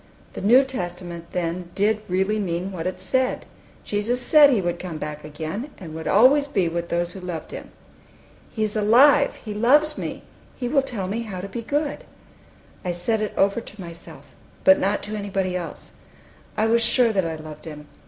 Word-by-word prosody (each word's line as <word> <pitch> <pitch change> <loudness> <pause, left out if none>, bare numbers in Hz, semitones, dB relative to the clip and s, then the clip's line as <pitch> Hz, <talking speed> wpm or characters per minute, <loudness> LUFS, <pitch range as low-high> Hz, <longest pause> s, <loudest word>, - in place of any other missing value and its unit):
The - - -6
New 240 +7 +6
Testament, 175 -8 -6
then, 175 0 -3
did 210 +2 +2
really 190 +4 +1
mean 180 -1 -2
what 180 -2 -4
it 185 0 -4
said! 255 +8 0 0.4
Jesus 215 +4 -1
said 290 +3 +7
He 245 -6 +3
would 175 -2 -2
come 175 -4 -6
back 150 0 -6
again, 160 - -5
and 165 -4 -9
would 160 0 -6
always 270 +7 +5
be 195 -10 +1
with 170 +1 -3
those 175 0 -1
who 190 - -9
loved 180 -3 -6
Him. - - -8 0.8
"He 220 - -2
is 215 0 -1
alive! 255 +7 +5
He 215 - -4
loves 295 +8 +3
me! - - -5 0.3
He 245 - -3
will 275 +2 +3
tell 230 -8 -4
me 215 +5 -2
how 205 -5 -6
to 190 - -5
be 215 +4 -5
good!" 290 +5 -2 0.8
I 180 - -1
said 215 +6 0
it 215 - -3
over 200 +4 +2
to 215 - -12
myself, 170 -2 -10 0.3
but 285 0 +7
not 200 +2 0
to 215 +1 -5
anybody 195 -3 -2
else. 175 -2 -6 0.7
I 215 - +2
was 230 +1 +3
sure 230 0 +3
that 190 -4 +1
I 160 - -3
loved 155 0 -10
Him. 150 -2 -9
200 Hz, 195 wpm, -23 LUFS, 175-235 Hz, 0.8 s, said